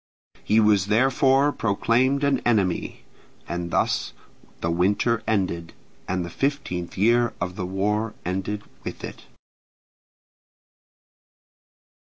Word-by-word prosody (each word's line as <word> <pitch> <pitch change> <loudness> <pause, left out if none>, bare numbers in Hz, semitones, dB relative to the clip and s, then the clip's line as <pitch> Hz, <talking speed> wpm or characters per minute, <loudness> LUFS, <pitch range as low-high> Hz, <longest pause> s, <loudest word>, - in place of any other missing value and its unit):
He 110 - +3
was 105 -3 +4
therefore 135 +5 +3
proclaimed 125 +5 +1
an 140 -2 +2
enemy. 100 -7 0 0.4
And 85 +1 -3
thus - - 0 0.5
the 85 - -1
winter 100 +6 +1
ended, 90 -6 -1 0.3
and 90 -1 -1
the - - -6
fifteenth 135 - -2
year 120 +4 +3
of 90 +1 -3
the 90 - -3
war 105 +3 -1
ended 95 +3 -3 0.2
with - - -7
it. - - -8
105 Hz, 105 wpm, -24 LUFS, 90-120 Hz, 0.5 s, was